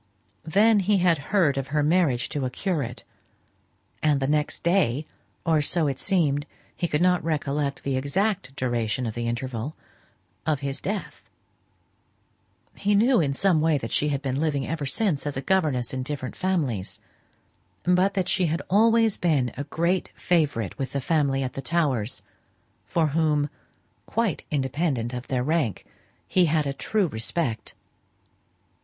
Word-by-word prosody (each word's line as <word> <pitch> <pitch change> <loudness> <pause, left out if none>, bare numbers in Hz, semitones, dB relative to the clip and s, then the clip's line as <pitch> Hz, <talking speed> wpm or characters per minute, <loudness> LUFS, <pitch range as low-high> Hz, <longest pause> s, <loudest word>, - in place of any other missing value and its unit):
Then 210 +6 +5
he 200 +1 +2
had 175 -4 +3
heard 170 -9 +3
of 135 - -4
her 150 +2 +1
marriage 150 -6 +2
to 145 - -2
a 130 - 0
curate; 140 - -3 1.0
and 150 -2 +3
the 135 - 0
next 150 +1 0
day 165 -6 +2 0.4
(or 160 -3 +3
so 160 +2 +1
it 135 -2 -1
seemed, 150 -7 +1 0.3
he 175 - -1
could 150 +1 +1
not 180 -1 +3
recollect 145 -3 -1
the 135 -1 -1
exact 140 +1 -1
duration 120 -2 -1
of 110 - -3
the 120 +1 -3
interval), 120 +3 -3 0.7
of 150 -3 0
his 140 -1 -3
death. 205 0 -5 1.4
He 205 0 +1
knew, 235 +2 +4
in 140 -3 0
some 180 -2 +3
way, 160 -1 +3
that 115 -4 -5
she 150 - +2
had 140 0 -2
been 135 +1 -1
living 145 -4 0
ever 155 -3 -3
since 150 0 0
as 145 - -3
a - - 0
governess 145 -9 +1
in 130 - -2
different 130 -1 -4
families; 150 - -1 0.8
but 180 +3 +3
that 185 -2 0
she 185 -2 +2
had 160 +2 -1
always 225 +1 +4
been 145 -8 +1
a 140 - -4
great 170 +5 0
favourite 145 - 0
with 135 -1 -3
the 140 - 0
family 140 -3 +1
at 130 - -4
the 135 - -5
Towers, 135 -8 0 0.6
for 160 -3 +1
whom, 150 -1 +1 0.6
quite 225 -9 -1
independent 135 -3 -1
of 125 +1 -5
their 125 -2 0
rank, 150 - 0 0.4
he 185 -1 +4
had 155 -1 +2
a 140 - -1
true 205 +8 0
respect. 115 -1 -2
150 Hz, 160 wpm, -25 LUFS, 135-175 Hz, 1.4 s, Then